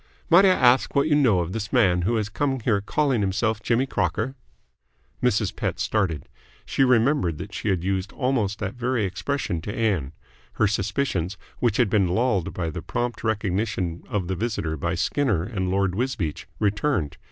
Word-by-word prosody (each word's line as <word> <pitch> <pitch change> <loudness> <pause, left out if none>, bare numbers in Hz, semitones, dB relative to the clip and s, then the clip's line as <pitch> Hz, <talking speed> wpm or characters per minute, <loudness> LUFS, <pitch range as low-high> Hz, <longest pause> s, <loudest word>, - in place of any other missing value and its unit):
"Might 180 +4 +8
I - - +7
ask 130 -8 +4
what 140 +2 +3
you 155 - +2
know 120 -11 +4
of 85 +1 -4
this 110 -2 -4
man 95 -9 +3
who 110 +7 +1
has 110 -2 0
come 135 +5 -1
here 105 -3 +1
calling 135 +2 +1
himself 105 +3 0
Jimmy 120 +4 +1
Crocker?" 105 +2 -1 0.9
Mrs. 110 -4 +1
Pett 90 -4 -2
started. 100 -7 -1 0.4
She 135 - +1
remembered 125 - +3
that - - -8
she - - -2
had 90 -3 0
used 95 0 -1
almost 120 -7 0
that 100 -2 -4
very 125 -3 -1
expression 95 - -2
to 100 - -5
Ann. 95 -11 -1 0.4
Her 110 - +2
suspicions, 95 -2 -1 0.2
which 115 -4 +1
had 120 - +4
been 100 -3 +3
lulled 100 -1 +1
by 85 -3 -3
the - - -5
prompt 120 0 -3
recognition 100 -5 -1
of 105 -7 -2
the 95 - -1
visitor 90 -7 -2
by 85 +4 -2
Skinner 100 - +1
and 95 -2 -3
Lord 95 -1 +1
Wisbeach, 100 - -2
returned. 105 - 0
105 Hz, 175 wpm, -24 LUFS, 95-125 Hz, 0.9 s, Might